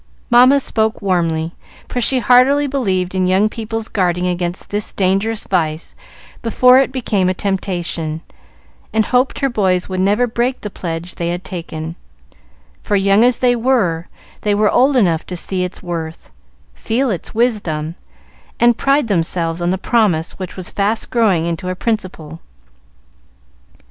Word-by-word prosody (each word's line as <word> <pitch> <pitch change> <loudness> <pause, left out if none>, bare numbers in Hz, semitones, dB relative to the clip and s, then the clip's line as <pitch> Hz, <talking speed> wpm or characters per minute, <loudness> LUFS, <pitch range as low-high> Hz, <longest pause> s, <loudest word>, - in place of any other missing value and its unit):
Mamma 255 +4 +6
spoke 220 -4 -1
warmly, 165 -3 0 0.3
for 245 - -3
she 260 +3 +2
heartily 255 +4 +4
believed 195 -10 -1
in 185 -1 +1
young 190 +3 +3
people's 225 0 -5
guarding 180 -2 0
against 175 0 -3
this 205 0 -1
dangerous 200 +4 0
vice 160 -3 -1 0.5
before 250 +3 +5
it 270 -1 +1
became 210 -8 0
a 185 - -1
temptation, 175 -5 -3 0.7
and 220 -1 +2
hoped 255 +1 +1
her 275 - +3
boys 190 -7 0
would 185 -1 -3
never 205 +6 +2
break 245 +2 -1
the 210 - -6
pledge 170 0 -5
they 170 0 -3
had 175 +2 -3
taken; 165 -3 -6 0.9
for, 205 - -1
young 195 +2 +4
as 245 -1 +4
they 245 -1 +3
were, 225 -9 +1 0.3
they 205 -1 +1
were 210 0 +3
old 265 +2 +3
enough 170 -8 +2
to 180 - -5
see 185 +1 -2
its 180 +1 -6
worth, 165 -2 -6 0.4
feel 240 - -1
its 185 - -5
wisdom, 185 -10 0 0.7
and 240 -1 +4
pride 275 -1 +2
themselves 170 -3 -1
on 175 - 0
the 185 - 0
promise 190 -7 +1
which 185 -2 -6
was 185 - -5
fast 210 +2 -1
growing 205 -9 +2
into 170 +2 -3
a 185 - -2
principle. 180 -8 -4
195 Hz, 155 wpm, -17 LUFS, 175-235 Hz, 0.9 s, Mamma